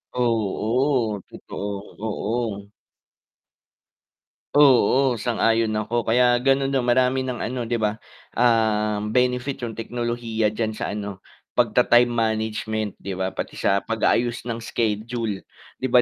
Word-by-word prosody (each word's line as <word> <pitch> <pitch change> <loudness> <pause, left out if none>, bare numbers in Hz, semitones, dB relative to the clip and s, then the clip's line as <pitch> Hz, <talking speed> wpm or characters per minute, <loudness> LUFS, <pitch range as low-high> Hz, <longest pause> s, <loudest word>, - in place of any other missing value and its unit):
Oo, 115 0 0
totoo, 100 0 -7
oo. 110 -1 -3 1.9
Oo, 135 -1 +5
sang-ayon 115 -1 +2
ako, 110 +3 -1
kaya 120 +1 +4
ganun 135 +1 +2
marami 125 +2 +2
ng 125 -2 -3
ano 120 -1 -3
'di 120 - +1
ba, 110 0 -1 0.3
ah, 110 -3 +2
benefit 125 +5 0
yung 115 -2 -5
teknolohiya 115 -1 -1
diyan 110 +1 -2
sa - - -4
ano, 100 -2 -5 0.3
pagta-time 120 0 +4
management 110 -2 -1
'di 100 - -6
ba, 95 0 -2
pati 95 - -6
sa 100 - +1
pag-aayos 120 +2 0
ng 115 - -2
schedule. 115 -2 -2 0.3
'Di 130 - -4
ba 125 -1 +5
115 Hz, 115 wpm, -23 LUFS, 105-125 Hz, 1.9 s, Oo